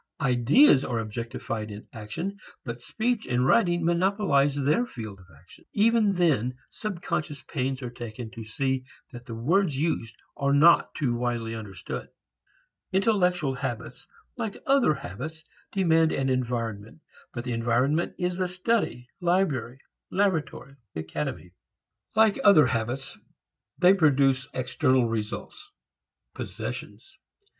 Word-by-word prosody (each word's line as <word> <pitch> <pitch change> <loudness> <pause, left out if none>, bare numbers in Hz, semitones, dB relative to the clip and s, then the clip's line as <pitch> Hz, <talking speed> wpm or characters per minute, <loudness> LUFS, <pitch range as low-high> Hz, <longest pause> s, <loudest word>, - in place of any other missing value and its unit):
Ideas 135 - +5
are 120 - -2
objectified 115 0 -4
in 105 +1 -9
action 165 - -5 0.3
but 120 -1 -5
speech 225 - -1
and 125 +1 +1
writing 175 +1 +3
monopolize 170 -5 +2
their 145 - +2
field 110 - -8
of 95 - -17
action. 90 - -18
Even 215 -1 +3
then 135 - +1
subconscious 170 -8 -4
pains 135 -2 -3
are 120 - -4
taken 120 -1 -7
to 115 - -8
see 130 +4 -1 0.3
that 120 -1 -10
the 115 - -6
words 155 - +1
used 140 -7 -1 0.2
are 140 0 +1
not 165 +4 +5
too 135 -6 0
widely 120 -1 -2
understood. 100 -5 -6 0.8
Intellectual 180 -7 +2
habits 125 -3 -5 0.3
like 215 -3 -3
other 270 - +4
habits 155 - -7 0.3
demand 165 -4 +3
an 135 -1 0
environment, 115 -1 -2 0.3
but 120 - -5
the 125 -1 -3
environment 125 +8 +1
is 180 -1 -1
the 185 -1 0
study, 180 - -1
library, 170 -9 0 0.3
laboratory 165 -7 -1 0.2
and 80 0 -4
academy. 90 - -4 0.6
Like 220 -2 +4
other 165 -8 +7
habits 125 +2 -2 0.6
they 180 +2 +6
produce 140 -7 +3
external 130 0 +1
results, 115 - -5 0.6
possessions. 390 - -7
135 Hz, 125 wpm, -27 LUFS, 120-180 Hz, 0.8 s, other